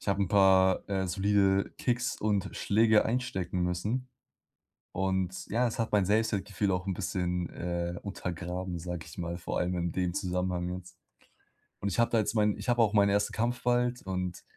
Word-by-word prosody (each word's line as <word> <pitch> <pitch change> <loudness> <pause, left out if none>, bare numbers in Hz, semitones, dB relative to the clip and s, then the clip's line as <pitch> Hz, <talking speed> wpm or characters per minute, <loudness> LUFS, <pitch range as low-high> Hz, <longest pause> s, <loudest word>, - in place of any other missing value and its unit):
Ich - - -13
habe 100 0 +1
'n 95 - -1
paar, 95 -2 +4
äh, 95 -1 0
solide 100 +1 +2
Kicks 125 0 -1
und 105 -3 0
Schläge 110 +1 +3
einstecken 95 -7 -1
müssen 105 +9 -1 0.9
und 95 -1 -1
ja, 120 +3 +1
es 115 - -4
hat 115 - -1
mein 100 -3 +3
Selbstwertgefühl 100 -2 0
auch 90 +1 -2
'n 95 - 0
bisschen, 90 -1 -2
äh, 85 0 -3
untergraben, 90 -2 -4
sage 90 -1 -5
ich - - -12
mal, 85 0 -3
vor 85 - -3
allem 90 +1 0
in 85 -1 -1
dem 90 -2 -1
Zusammenhang, 90 -2 -1
ne? 90 +1 -4 1.0
Und 100 - -1
ich 100 - -3
habe 115 - +3
da 115 - +3
jetzt 110 +1 0
mein 105 -1 +2
ich - - -8
habe 120 -1 +4
auch 110 -2 +3
meinen 100 -1 +4
1. 100 +1 +1
Kampf 120 +2 -1
bald 125 0 +1
und 90 -2 -4
95 Hz, 185 wpm, -30 LUFS, 90-105 Hz, 1.0 s, paar